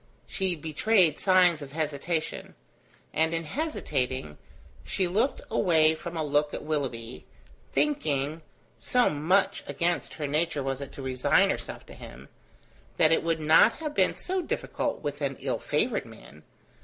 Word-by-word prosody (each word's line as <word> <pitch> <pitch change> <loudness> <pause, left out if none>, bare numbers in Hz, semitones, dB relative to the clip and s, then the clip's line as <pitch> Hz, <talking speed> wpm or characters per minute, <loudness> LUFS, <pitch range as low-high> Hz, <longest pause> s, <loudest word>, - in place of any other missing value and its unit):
She 190 -3 -1
betrayed 165 +2 +2
signs 180 -4 +4
of 140 -1 -9
hesitation; 155 +1 -3 0.6
and 160 +1 +1
in 165 - -2
hesitating, 130 - -3 0.4
she 190 -2 -1
looked 215 +10 0
away 160 -7 +4
from 170 +1 -7
a 160 - 0
look 145 0 +1
at - - -6
Willoughby, 130 -6 -4 0.4
thinking 155 - 0 0.4
(so 250 -1 +2
much 165 +7 +1
against 170 +5 -1
her 150 - -3
nature 150 0 0
was 135 0 -3
it 140 -1 -7
to 135 - -8
resign 130 -1 +3
herself - - -6
to - - -12
him) - - -12 0.7
that 155 - +5
it 165 - +4
would 165 -1 0
not 155 +8 +6
have 305 -2 -5
been - - +2
so 375 0 -2
difficult 295 - -3
with 145 0 -4
an 140 -1 -2
ill - - -2
favoured - - 0
man. 70 +5 -14
155 Hz, 150 wpm, -27 LUFS, 145-180 Hz, 0.7 s, not